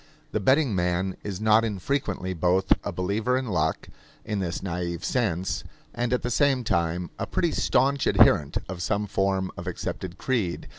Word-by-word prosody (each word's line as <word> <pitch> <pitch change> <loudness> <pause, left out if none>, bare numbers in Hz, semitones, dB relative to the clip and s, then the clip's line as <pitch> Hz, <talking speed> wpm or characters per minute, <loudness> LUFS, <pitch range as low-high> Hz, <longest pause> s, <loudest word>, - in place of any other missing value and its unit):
The - - 0
betting 130 +4 +3
man 90 +1 0
is 100 -2 -4
not 110 +1 +4
infrequently 100 -3 -2
both 90 +2 +3
a - - -3
believer 105 +7 0
in 130 - -2
luck, 90 -9 -1 0.4
in 105 -2 -2
this 90 -2 -3
naive 85 -2 -3
sense, 95 -8 -1 0.3
and 120 0 -1
at 125 - +1
the 125 - -2
same 135 -1 +2
time 85 -3 -1
a - - -2
pretty - - 0
staunch 140 0 +2
adherent 75 -2 +4
of 90 -1 -6
some 100 +3 0
form 95 -1 0
of - - -8
accepted 90 -1 -5
creed. 110 -10 -1
95 Hz, 165 wpm, -26 LUFS, 90-120 Hz, 0.4 s, not